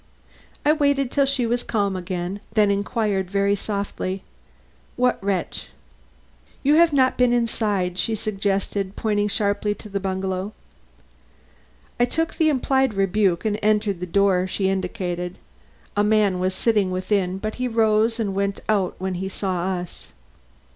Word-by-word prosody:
I 300 - +6
waited 285 -4 +1
till 280 -1 +2
she 270 -3 +1
was 240 +1 0
calm 200 -5 -1
again, 180 +1 -4
then 210 -2 +4
I - - +3
inquired 200 -2 -1
very 200 +1 +2
softly: 200 -2 -3 0.7
"What 250 -4 +1
wretch?" 195 -2 -2 1.0
"You 285 +2 +4
have 335 -1 +6
not 260 -3 +3
been 250 -1 +4
inside," 205 -6 0
she 225 +4 +1
suggested, 200 -1 -2
pointing 210 -2 0
sharply 205 0 0
to 210 - -11
the 200 0 -2
bungalow. 190 +1 -3 1.5
I 245 - +5
took 325 +6 -1
the 315 -1 +2
implied 265 -4 +1
rebuke 195 -1 +1
and 210 -1 0
entered 210 -3 +1
the 180 - -4
door 190 0 +2
she 190 0 0
indicated. 180 -2 -3 0.6
A 205 - +3
man 210 -3 +3
was 185 +1 0
sitting 210 -4 +2
within, 185 0 0
but 215 +2 -4
he 255 - +1
rose 225 0 +2
and 205 -4 -1
went 200 0 -1
out 200 -4 +1
when 190 0 -3
he 190 +2 -3
saw 185 -3 -2
us. 175 -1 -9
205 Hz, 150 wpm, -23 LUFS, 190-225 Hz, 1.5 s, I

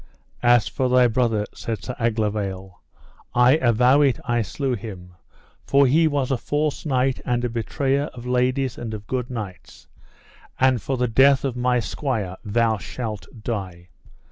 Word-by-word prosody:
As 120 -3 +4
for 130 -1 -1
thy 125 0 +5
brother, 115 -3 +1
said 110 -4 -5
Sir 125 - -5
Aglovale, 105 -5 -2 0.5
I 125 +4 +5
avow 125 +1 +4
it 140 -3 +2
I 120 0 +1
slew 130 +6 -2
him, 95 -6 -8 0.5
for 140 0 +5
he 160 +5 +4
was 140 -3 -1
a 135 - +2
false 150 +1 -2
knight 130 -1 +1
and 120 0 -1
a - - -1
betrayer 135 +4 -1
of 120 -4 -10
ladies 125 +1 0
and 110 -2 -5
of 105 -1 -9
good 125 0 -3
knights; 105 -7 -8 0.7
and 130 -2 +3
for 135 - -2
the 125 0 +1
death 135 +4 +4
of 130 -3 -2
my 125 0 +1
squire 110 -6 -3
thou 110 0 +1
shalt 110 0 -6 0.2
die. 95 -6 -5
120 Hz, 160 wpm, -23 LUFS, 110-130 Hz, 0.7 s, thy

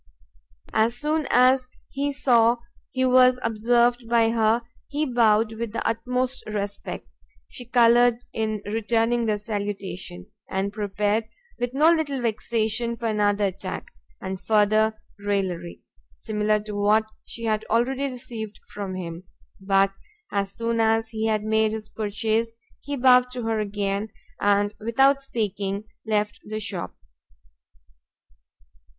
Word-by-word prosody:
As 225 +2 +2
soon 305 +2 -1
as 255 +1 +4 0.2
he 285 +1 -1
saw 240 -4 +3 0.3
he 260 -1 0
was 255 0 +5
observed 235 +2 +2
by 230 -1 +4
her, 225 +1 +2 0.2
he 295 +2 -1
bowed 225 -4 +3
with 230 -2 -3
the - - -2
utmost 250 +3 -1
respect: 205 -1 -5 0.3
she 245 - -9
coloured 240 0 +5 0.2
in 215 -2 -2
returning 225 +2 +1
the 210 -1 +1
salutation, 200 -4 -5 0.2
and 195 +1 -2
prepared, 210 +1 0 0.3
with 245 +1 -2
no 310 +4 +6
little 305 -5 0
vexation, 230 0 0
for 235 - -6
another 205 -1 +2
attack, 190 0 -5 0.3
and 190 0 -5
further 215 0 +3 0.2
[raillery], 190 -4 -2 0.3
similar 210 0 0
to 210 0 -7
what 210 +2 +3 0.2
she 230 - -9
had 215 -1 0
already 255 +5 +1
received 240 -5 -6
from 200 -2 -4
him: 175 0 -6 0.3
but, 195 0 +2 0.4
as 200 -1 -1
soon 230 +1 -1
as 225 0 +2
he 220 0 -2
had 215 -1 +1
made 220 0 +2
his 215 -1 -6
purchase, 220 +2 -1 0.3
he 285 0 -4
bowed 250 -1 +5
to 250 -1 -5
her 225 -1 0
again, 205 0 -2 0.3
and, 205 0 +2
without 270 +5 +3
speaking, 205 -6 -2 0.2
left 210 0 0
the 215 +1 -5
shop. 205 -4 -4
220 Hz, 130 wpm, -24 LUFS, 205-240 Hz, 0.4 s, no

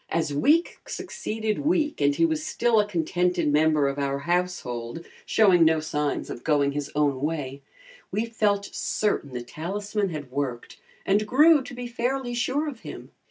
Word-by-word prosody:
As 160 -3 -1
week 300 - +2
succeeded 220 0 -3
week 300 - 0
and 145 0 +3
he 165 - +3
was 160 -2 -1
still 235 -2 +2
a 205 - +2
contented 175 -3 0
member 155 -1 +3
of 140 +1 -2
our 140 -1 0
household, 165 -5 -2 0.2
showing 190 -6 +5
no 160 0 +4
signs 150 -2 -2
of 120 - -8
going 145 -3 +2
his 145 0 -4
own 145 -3 +1
way, 145 -3 -3 0.5
we 215 +2 -1
felt 210 -3 0
certain 205 -9 -1
the 125 -1 -5
talisman 200 - -3
had 150 -6 -6
worked 130 -3 -4 0.3
and 205 +2 +2
grew 300 +5 +6
to 265 0 -9
be 245 0 -6
fairly 245 +1 -2
sure 265 +5 0
of 270 -6 -6
him. - - -9
170 Hz, 165 wpm, -25 LUFS, 145-220 Hz, 0.5 s, grew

